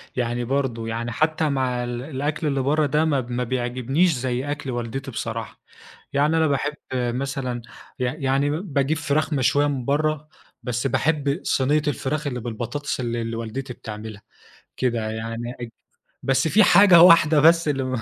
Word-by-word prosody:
يعني 120 -1 -1
برضه، 125 -4 -1
يعني 115 +1 -3
حتى 155 +3 +1
مع 130 -3 -1
ال 120 0 -4
الأكل 145 +2 -3
اللي 140 -2 0
برّا 150 +3 +2
ده 150 +3 +1
ما 140 -4 +1
ما 125 +1 -3
بيعجبنيش 130 +7 0
زي 130 +2 -2
أكل 145 -3 -4
والدتي 120 +3 -4
بصراحة. 115 0 -5 0.5
يعني 150 +3 +2
أنا 160 -1 +3
باحب 145 +1 0 0.2
مثلًا 125 0 -2 0.4
ي 125 - -1
يعني 135 +1 0
باجيب 150 -2 -1
فراخ 155 0 0
مشوية 140 +2 +2
من 135 -4 -3
برّا، 155 +1 0 0.4
بس 125 +1 -1
باحب 145 +2 0
صينية 145 +3 +2
الفراخ 145 +2 -2
اللي 125 -3 -3
بالبطاطس 120 +5 -4
اللي 120 -1 -2
اللي 115 0 -4
والدتي 115 +3 -5
بتعملها، 110 -2 -8 0.6
كده 115 -4 -1
يعني 115 +2 -5
أج 120 - -5 0.5
بس 135 +3 +1
في 210 +6 +5
حاجة 185 -1 +7
واحدة 165 -3 +7
بس 165 +1 +5
اللي 135 -2 0
ما 130 -2 -2
135 Hz, 160 wpm, -23 LUFS, 120-150 Hz, 0.6 s, حاجة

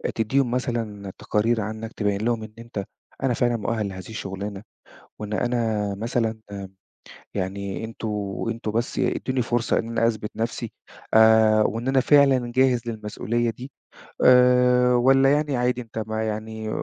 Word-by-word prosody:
تديهم 120 +3 +1
مثلًا 115 -6 -3
تقارير 110 +2 0
عنك، 110 +2 -5
تبين 100 -1 -1
لهُم 115 -2 0
إن 110 0 -10
أنت، 115 -4 -5 0.4
أنا 130 -2 +2
فعلًا 120 0 +1
مؤهل 110 -1 -2
لهذه 95 0 -9
الشغلانة، 100 -1 -6 0.6
وإن 105 0 -6
أنا 110 -3 0
مثلًا 115 +1 -2
آآ 100 -1 -6 0.7
يعني 100 +2 -3
انتم 115 0 -6 0.4
انتم 115 -1 -3
بس 115 +3 -2
ادوني 130 -1 0
فرصة 120 0 0
إن 115 - -3
أنا 115 0 +1
أثبت 110 -2 -2
نفسي، 115 0 -3 0.4
آآ 110 -1 +6
وإن 115 +4 -1
أنا 135 0 +3
فعلًا 135 -3 +4
جاهز 130 -2 +4
للمسئولية 115 +2 -2
دي. 125 +4 -9 0.6
آآ 125 0 +5
والّا 135 +2 +5
يعني 145 -2 +1
عادي 125 0 0
أنت، 110 -2 -5
ما 110 0 -2
يعني 110 0 -4
115 Hz, 145 wpm, -24 LUFS, 110-125 Hz, 0.7 s, آآ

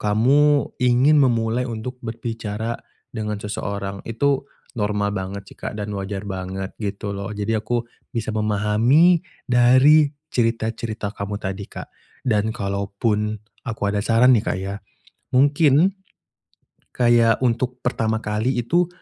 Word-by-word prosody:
kamu 140 +8 +3
ingin 125 +5 +4
memulai 120 -1 +1
untuk 120 +3 -6
berbicara 115 -1 -4 0.3
dengan 105 -2 -3
seseorang. 100 -1 -4
Itu 135 +4 0 0.2
normal 105 -2 -1
banget 95 0 -4
sih - - -19
Kak, - - -5
dan 105 0 -4
wajar 100 0 -4
banget 95 0 -5
gitu 100 0 -3
loh. 100 -1 -5
Jadi 105 +2 -1
aku 115 +2 -2 0.2
bisa 110 -2 -3
memahami 110 - +3 0.2
dari 130 +5 +5 0.2
cerita-cerita 115 -2 -1
kamu 100 0 -4
tadi 95 -1 -5
Kak, - - -9 0.3
dan 110 -3 +1
kalaupun 100 +1 -1 0.3
aku 115 -3 -5
ada 105 - 0
saran 115 +4 +4
nih 110 - +3
Kak, - - 0
ya. 100 +1 -4 0.6
Mungkin 145 +7 +4 0.9
kayak 120 0 +3
untuk 125 +1 -1
pertama 110 -3 0
kali 110 +5 0
itu 170 +9 +2
110 Hz, 125 wpm, -22 LUFS, 105-125 Hz, 0.9 s, dari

